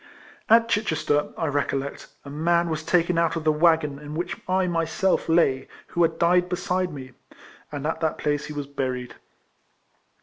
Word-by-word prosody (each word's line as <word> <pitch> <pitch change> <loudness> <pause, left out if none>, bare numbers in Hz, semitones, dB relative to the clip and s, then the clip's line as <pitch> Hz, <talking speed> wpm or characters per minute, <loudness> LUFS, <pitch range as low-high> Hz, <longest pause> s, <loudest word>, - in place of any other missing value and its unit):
At 230 +1 +6
Chichester, 160 -9 0
I 165 - -1
recollect, 140 -1 -2 0.2
a 140 - -8
man 170 +3 +1
was 155 0 -2
taken 170 +1 +2
out 165 0 +1
of 165 - -3
the 155 - +4
waggon 155 -2 +2
in 150 0 -8
which 175 +2 -3
I 185 +1 +2
ray 170 -2 0
self 190 +1 0
lay, 150 -6 +3 0.2
who 175 - -1
had 165 -1 +2
died 180 +1 +3
beside 180 0 -1
me; 130 -3 -8 0.6
and 145 -1 -5
at 160 +1 -1
that 160 -1 -1
place 150 0 -1
he 150 - -7
was 145 -1 -4
buried. 130 -3 -4
160 Hz, 175 wpm, -25 LUFS, 145-175 Hz, 0.6 s, At